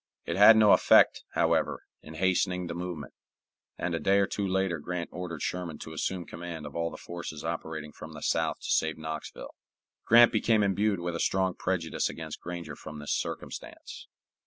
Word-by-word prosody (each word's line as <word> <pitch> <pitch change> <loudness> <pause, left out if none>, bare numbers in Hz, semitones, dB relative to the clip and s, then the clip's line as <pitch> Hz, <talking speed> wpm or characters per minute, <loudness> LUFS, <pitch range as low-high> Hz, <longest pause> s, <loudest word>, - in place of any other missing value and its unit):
It 85 - -2
had 105 +3 +8
no 105 -2 +6
effect, - - +5
however, - - +1 0.2
in 80 - -11
hastening 90 +1 +1
the 85 - -5
movement, 85 -5 -6 0.6
and 85 - -2
a 80 - -1
day 95 +6 +3
or 100 - +4
two 100 0 -3
later 95 -3 0
Grant 90 +2 -4
ordered 85 -3 -5
Sherman 90 -4 -3
to 80 - -9
assume 85 +2 -2
command 85 -2 -7
of 75 - -9
all 85 0 -1
the - - -9
forces 85 -3 -7
operating 80 -2 -4
from - - -10
the - - -9
south - - 0
to - - -3
save 80 0 +1
Knoxville. 80 0 -7 0.5
Grant 120 +1 +7
became 110 -1 +2
imbued 100 0 +1
with 85 0 -3
a - - -3
strong 95 -1 +1
prejudice 90 -3 -1
against - - -7
Granger 85 0 -6
from 75 0 -9
this 75 0 -3
circumstance. - - -6
85 Hz, 180 wpm, -29 LUFS, 80-95 Hz, 0.6 s, had